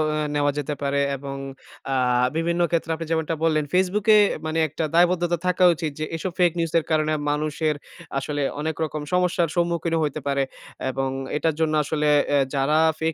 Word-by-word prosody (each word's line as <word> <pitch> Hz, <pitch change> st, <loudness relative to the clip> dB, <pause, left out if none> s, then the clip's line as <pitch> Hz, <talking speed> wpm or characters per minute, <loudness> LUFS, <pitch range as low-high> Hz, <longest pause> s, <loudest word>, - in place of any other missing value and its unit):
ও 150 Hz, 0 st, -1 dB
নেওয়া 145 Hz, 0 st, +2 dB
যেতে 145 Hz, 0 st, -2 dB
পারে 140 Hz, 0 st, 0 dB, 0.2 s
এবং 135 Hz, 0 st, -6 dB, 0.6 s
আ 135 Hz, -, +1 dB, 0.4 s
বিভিন্ন 170 Hz, +1 st, 0 dB
ক্ষেত্রে 165 Hz, -1 st, 0 dB
আপনি 165 Hz, 0 st, -6 dB
যেমনটা 160 Hz, 0 st, 0 dB
বললেন 155 Hz, -2 st, +2 dB
Facebook 190 Hz, +3 st, +1 dB
এ -, -, +7 dB, 0.3 s
মানে 160 Hz, +1 st, -1 dB
একটা 155 Hz, +2 st, -4 dB
দায়বদ্ধতা 175 Hz, 0 st, +3 dB
থাকা 180 Hz, 0 st, +2 dB
উচিত 160 Hz, -2 st, -3 dB
যে 155 Hz, -, -1 dB
এসব 180 Hz, +3 st, -3 dB
ফেক 175 Hz, -1 st, +5 dB
নিউজ 165 Hz, -1 st, -1 dB
এর -, -, -8 dB
কারণে 155 Hz, 0 st, +2 dB, 0.2 s
মানুষের 150 Hz, +1 st, 0 dB, 0.4 s
আসলে 145 Hz, +1 st, -3 dB, 0.2 s
অনেক 155 Hz, 0 st, -2 dB
রকম 155 Hz, -1 st, -3 dB
সমস্যার 180 Hz, -1 st, +2 dB
সম্মুখীনও 170 Hz, -1 st, 0 dB
হইতে 150 Hz, 0 st, -2 dB
পারে। 140 Hz, -1 st, +1 dB, 0.5 s
এবং 135 Hz, 0 st, -2 dB, 0.3 s
এটার 160 Hz, 0 st, 0 dB
জন্য 155 Hz, -1 st, +1 dB
আসলে 150 Hz, +1 st, 0 dB, 0.2 s
অ্যা 145 Hz, -, +3 dB, 0.2 s
যারা 140 Hz, +3 st, +2 dB, 0.2 s
ফেক 160 Hz, 0 st, 0 dB
160 Hz, 180 wpm, -23 LUFS, 150-170 Hz, 0.6 s, এ